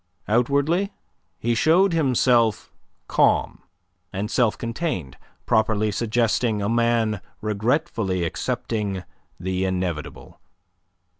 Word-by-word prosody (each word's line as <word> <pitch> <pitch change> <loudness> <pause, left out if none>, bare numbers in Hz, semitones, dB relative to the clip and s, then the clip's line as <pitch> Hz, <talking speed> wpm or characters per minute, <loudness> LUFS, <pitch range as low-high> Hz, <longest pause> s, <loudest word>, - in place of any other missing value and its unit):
Outwardly 140 - +2 0.5
he 120 +1 0
showed 170 - +4
himself 125 -7 +2 0.3
calm - - +2 0.5
and 105 +4 -3
self 120 -4 +2
contained, 115 - -3 0.3
properly 110 -1 +2
suggesting 115 0 +1
a 100 - -1
man 115 -3 +1 0.2
regretfully 110 - 0
accepting 105 -1 -2 0.4
the 95 +1 -2
inevitable. 90 -5 -4
115 Hz, 85 wpm, -23 LUFS, 100-125 Hz, 0.5 s, showed